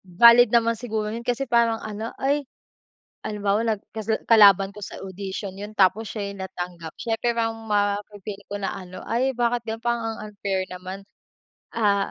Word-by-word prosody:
Valid 235 Hz, +6 st, +7 dB
naman 230 Hz, 0 st, +3 dB
siguro 220 Hz, -2 st, -3 dB
'yun 230 Hz, -, -4 dB
kasi 245 Hz, +3 st, -1 dB
parang 235 Hz, -2 st, +3 dB
ano, 220 Hz, +1 st, -5 dB
ay, 285 Hz, +2 st, +1 dB, 0.8 s
halimbawa 205 Hz, 0 st, 0 dB
nag 215 Hz, -3 st, 0 dB
kasla 220 Hz, 0 st, -1 dB
kalaban 200 Hz, -3 st, +7 dB
ko 210 Hz, -, -10 dB
sa -, -, -7 dB
audition 195 Hz, +1 st, -5 dB
'yun 205 Hz, +2 st, -7 dB
tapos 200 Hz, +3 st, +3 dB
siya 200 Hz, -2 st, -4 dB
'yung 195 Hz, -, -8 dB
natanggap 175 Hz, -3 st, -6 dB
siyempre 235 Hz, +1 st, -1 dB
mang 225 Hz, -1 st, -2 dB
mafe-feel 205 Hz, 0 st, -1 dB
ko 205 Hz, -, -4 dB
na 195 Hz, -, -2 dB
ano, 185 Hz, -1 st, -9 dB
"Ay 255 Hz, +4 st, +1 dB
bakit 240 Hz, 0 st, +1 dB
gano'n 225 Hz, +1 st, -5 dB
parang 235 Hz, 0 st, 0 dB, 0.2 s
ang -, -, -10 dB
unfair 195 Hz, -2 st, -2 dB
naman, 185 Hz, +2 st, -7 dB, 0.7 s
ah, 200 Hz, -3 st, +2 dB
210 Hz, 170 wpm, -24 LUFS, 195-230 Hz, 0.8 s, Valid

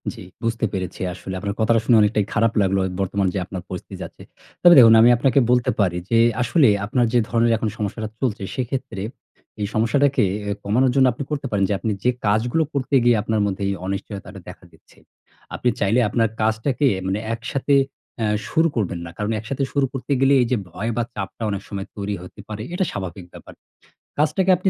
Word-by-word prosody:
জি, 115 Hz, -, -11 dB, 0.2 s
বুঝতে 115 Hz, 0 st, 0 dB
পেরেছি। 95 Hz, -3 st, -4 dB
আসলে 95 Hz, +1 st, -8 dB
আপনার 100 Hz, +2 st, -3 dB
কথাটা 115 Hz, +1 st, +3 dB
শুনে 115 Hz, -, +5 dB
অনেকটাই 105 Hz, 0 st, +2 dB
খারাপ 115 Hz, 0 st, +2 dB
লাগলো। 95 Hz, 0 st, +1 dB
এ -, -, -5 dB
বর্তমান 95 Hz, 0 st, 0 dB
যে 100 Hz, -, -1 dB
আপনার 95 Hz, -1 st, -6 dB
পরিস্থিতি 90 Hz, -, -7 dB
যাচ্ছে। -, -, -11 dB, 0.4 s
তবে 175 Hz, -1 st, +8 dB
দেখুন, 115 Hz, -2 st, +8 dB
আমি 120 Hz, -, +7 dB
আপনাকে 135 Hz, +2 st, +3 dB
বলতে 125 Hz, +1 st, +3 dB
পারি 90 Hz, -4 st, +2 dB
যে, 115 Hz, -, +3 dB, 0.2 s
আসলে 125 Hz, +4 st, +4 dB, 0.2 s
আপনার 120 Hz, +3 st, +1 dB
যে 120 Hz, -, +5 dB
ধরনের 115 Hz, +1 st, +2 dB
এখন 110 Hz, 0 st, -1 dB
সমস্যাটা 110 Hz, +1 st, -3 dB
চলছে 110 Hz, -6 st, -2 dB
সেক্ষেত্রে, 130 Hz, -4 st, -4 dB, 0.6 s
এই 100 Hz, -, 0 dB
সমস্যাটাকে 135 Hz, +5 st, +2 dB, 0.3 s
এ -, -, 0 dB
কমানোর 125 Hz, +6 st, +2 dB
জন্য 135 Hz, -1 st, +5 dB
আপনি 135 Hz, -, -5 dB
করতে 145 Hz, -2 st, -3 dB
পারেন 100 Hz, -2 st, +1 dB
যে, -, -, +1 dB
আপনি 110 Hz, -, -2 dB
যে 125 Hz, -, +3 dB, 0.2 s
কাজগুলো 115 Hz, +9 st, +2 dB
করতে 140 Hz, 0 st, -1 dB
গিয়ে 120 Hz, -1 st, +5 dB
আপনার 110 Hz, -1 st, 0 dB
মধ্যে 100 Hz, 0 st, -2 dB
এই -, -, 0 dB
অনিশ্চয়তাটা 100 Hz, +1 st, -6 dB
দেখা -, -, -12 dB
দিচ্ছে, -, -, -24 dB, 0.6 s
আপনি 125 Hz, -, +1 dB
চাইলে 100 Hz, +5 st, +2 dB
আপনার 115 Hz, +2 st, +2 dB
কাজটাকে 115 Hz, +6 st, +1 dB, 0.2 s
মানে 95 Hz, +2 st, -1 dB
একসাথে 130 Hz, +4 st, -2 dB, 0.5 s
এ্যা 110 Hz, -, 0 dB, 0.2 s
শুরু 160 Hz, +1 st, +3 dB
করবেন 95 Hz, -6 st, -1 dB
না। -, -, -8 dB
কারণ 105 Hz, +1 st, -2 dB
একসাথে 130 Hz, +6 st, -3 dB
শুরু 140 Hz, -1 st, +2 dB
করতে 135 Hz, +1 st, -5 dB
গেলে 135 Hz, +1 st, +4 dB
এই 120 Hz, -, +1 dB
যে 125 Hz, -, +3 dB
ভয় 100 Hz, +6 st, -3 dB
বা 120 Hz, -, +2 dB
চাপটা 100 Hz, +3 st, -5 dB
অনেক 100 Hz, -1 st, -3 dB
সময় 100 Hz, -2 st, -5 dB
তৈরি 100 Hz, 0 st, -3 dB
হতে 90 Hz, +3 st, -13 dB
পারে। 105 Hz, 0 st, -5 dB
এটা 185 Hz, +1 st, 0 dB
স্বাভাবিক 95 Hz, -1 st, -6 dB
ব্যাপার। -, -, -12 dB, 0.6 s
কাজটাকে 155 Hz, +6 st, +2 dB
আপনি 185 Hz, +2 st, +1 dB
115 Hz, 195 wpm, -22 LUFS, 100-130 Hz, 0.6 s, তবে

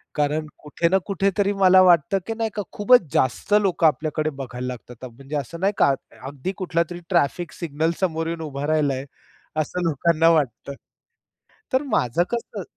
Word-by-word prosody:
कारण 150 Hz, +1 st, 0 dB, 0.2 s
कुठे 150 Hz, +3 st, 0 dB
ना 190 Hz, -, +4 dB
कुठेतरी 200 Hz, 0 st, 0 dB
मला 185 Hz, 0 st, +7 dB
वाटतं, 180 Hz, +1 st, +4 dB
की 225 Hz, -, -2 dB
नाही 225 Hz, -1 st, -1 dB
का, 205 Hz, -, -1 dB
खूपच 205 Hz, -, +4 dB
जास्त 130 Hz, +10 st, 0 dB
लोकं 180 Hz, -4 st, +3 dB
आपल्याकडे 155 Hz, 0 st, -1 dB
बघायला 125 Hz, -1 st, -6 dB
लागतात. 125 Hz, 0 st, -8 dB
म्हणजे 135 Hz, +5 st, -8 dB
असं 145 Hz, +4 st, -4 dB
नाही 195 Hz, +2 st, +1 dB
का 140 Hz, -, +4 dB, 0.3 s
अगदी 140 Hz, +6 st, -5 dB
कुठलातरी 175 Hz, -1 st, -2 dB
ट्रॅफिक 170 Hz, -1 st, 0 dB
सिग्नल 160 Hz, -1 st, -1 dB
समोर 165 Hz, -3 st, -1 dB
येऊन 165 Hz, 0 st, -4 dB
उभा 145 Hz, -2 st, -4 dB
राहिला 150 Hz, -3 st, +2 dB
आहे, 130 Hz, +1 st, -5 dB, 0.6 s
असं 180 Hz, +4 st, -4 dB
लोकांना 165 Hz, +2 st, +3 dB
वाटतं. 140 Hz, -4 st, 0 dB, 1.0 s
तर 260 Hz, +2 st, +2 dB
माझं 175 Hz, -, +1 dB
कसं 230 Hz, -4 st, -4 dB
165 Hz, 160 wpm, -23 LUFS, 145-185 Hz, 1.0 s, मला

